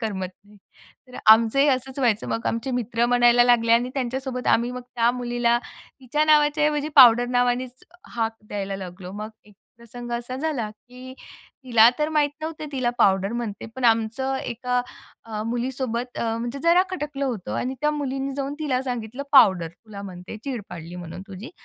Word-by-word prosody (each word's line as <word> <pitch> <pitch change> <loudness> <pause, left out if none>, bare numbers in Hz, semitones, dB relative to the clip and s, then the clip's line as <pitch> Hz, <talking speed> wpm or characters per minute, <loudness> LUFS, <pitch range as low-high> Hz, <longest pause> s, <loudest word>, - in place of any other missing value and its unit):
करमत 195 -5 -3 0.2
नाही. 210 0 -19 0.5
तर 250 - -11 0.2
आमचं 225 +3 +3
ही 285 - +5
असंच 265 +1 -1
व्हायचं. 230 -5 +1
मग 230 - -3
आमचे 230 +4 -2
मित्र 235 -1 0
म्हणायला 240 0 +5
लागले 230 -2 +4
आणि 240 +2 +3
त्यांच्यासोबत 260 0 -3
आम्ही 240 +2 +2
मग 250 0 -6
त्या 235 0 +3
मुलीला 240 -1 0 0.4
तिच्या 295 +4 0
नावाच्या 300 0 +4
ऐवजी 300 0 0
पावडर 245 -3 +8
नावानेच 245 +1 -1 0.3
हाक 225 -1 -1
द्यायला 195 -1 -4
लागलो. 185 0 -9
मग 210 +1 -6 0.2
एक 210 - -20 0.2
प्रसंग 240 +1 -10
असा 240 +2 -4
झाला, 270 -7 -2
की 250 +4 -13 0.5
तिला 230 -3 +6
तर 300 +1 +1
माहीत 300 -2 +1
नव्हतं 310 -1 -5
तिला 255 -3 0
पावडर 195 +2 +3
म्हणते 230 -4 -5
पण 260 - -4
आमचं 230 +4 +1
एका 250 0 -2 0.4
अ, 215 -2 -5
मुलीसोबत 245 0 -3
म्हणजे 235 +3 -3
जरा 340 +2 +5
खटकलं 295 -6 -4
होतं 230 -9 -4
आणि 260 +2 -2
त्या 300 - +2
मुलीने 275 -2 -3
जाऊन 275 0 -3
तिला 270 -5 -1
सांगितलं, 245 0 -5
"पावडर! 190 -11 +6
तुला 200 +2 -12
म्हणते 185 +1 -9
चीड 250 -6 -4
पाडली 175 0 -9
म्हणून 175 +1 -8
तुझी." 200 +6 -9
240 Hz, 170 wpm, -24 LUFS, 225-265 Hz, 0.5 s, पावडर